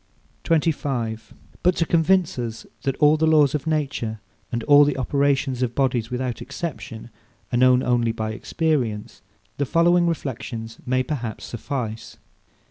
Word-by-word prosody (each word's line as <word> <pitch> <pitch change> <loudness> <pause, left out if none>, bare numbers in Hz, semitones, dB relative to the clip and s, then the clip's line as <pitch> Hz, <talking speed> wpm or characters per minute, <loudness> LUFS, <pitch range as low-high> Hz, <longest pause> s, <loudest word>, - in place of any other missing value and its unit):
25. 135 -9 -1 0.3
But 180 0 +3
to 165 - +1
convince 170 -2 +2
us 115 -2 -5 0.2
that 135 - -1
all 150 +1 +5
the 160 +1 +2
laws 150 -4 +5
of 150 +1 -2
nature, 140 -8 -1 0.3
and 120 -1 -2
all 145 0 +7
the 145 -1 +1
operations 135 -1 +1
of 120 -2 -1
bodies 125 -4 +1
without 125 -1 -3
exception, 135 -6 -6 0.4
are - - +3
known 130 0 +5
only 120 -2 +2
by 110 -1 -3
experience, 120 -3 -2 0.4
the 140 - 0
following 175 +2 +4
reflections 125 -7 -4
may, 130 +1 +2
perhaps, 125 -6 -4
suffice. 115 -1 -5
130 Hz, 140 wpm, -23 LUFS, 115-150 Hz, 0.4 s, all